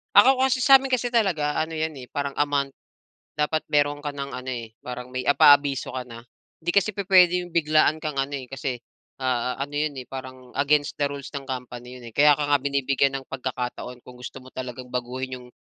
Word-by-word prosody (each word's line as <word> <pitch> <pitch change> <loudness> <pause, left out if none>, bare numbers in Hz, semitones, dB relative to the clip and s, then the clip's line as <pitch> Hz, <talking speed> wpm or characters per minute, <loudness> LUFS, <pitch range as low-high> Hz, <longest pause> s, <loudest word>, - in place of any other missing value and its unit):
Ako 260 +5 +7
kasi 265 0 +3
sa'min 270 +1 +6
kasi 245 -1 0
talaga 170 -10 +2
ano 160 0 -3
'yan, 160 0 -1
eh, 125 - -12
parang 140 -1 -3
a - - 0
month, 140 -1 0 0.6
dapat 150 +1 0
meron 145 0 +2
ka 145 -1 -5
ng 140 -1 -5
ano, 125 +1 -7
eh, 115 -3 -6
parang 125 0 -7
may 130 -1 -4
a 145 - +5
paabiso 145 -2 +5
ka 125 -1 -5
na. 115 -1 -10 0.4
'Di 175 - +1
kasi 200 +2 +2
pupuwede 185 -3 +5
'yong 175 - -11
biglaan 155 -1 +3
kang 155 -2 -4
ano, 135 +1 -1
eh, 130 - -9
kasi, 130 -2 -4 0.4
ah, 125 -1 -1
ano 145 +1 -4
'yon, 150 +1 0
eh, 125 - -9
parang 130 -1 -9
against 145 +1 +2
the 145 - -1
rules 140 -1 -7
ng 140 - -4
company 125 -1 -7
'yon, 120 - -11
eh, 115 - -11
kaya 150 +1 +7
ka 145 - 0
nga 145 - +4
binibigyan 140 -1 +1
ng 135 - -17
pagkakataon 125 -1 -5
kung 125 - -11
gusto 125 +2 -8
mo 130 - -15
talagang 125 0 -6
baguhin 125 +1 -4
'yong 125 -1 -12
140 Hz, 215 wpm, -25 LUFS, 125-155 Hz, 0.6 s, Ako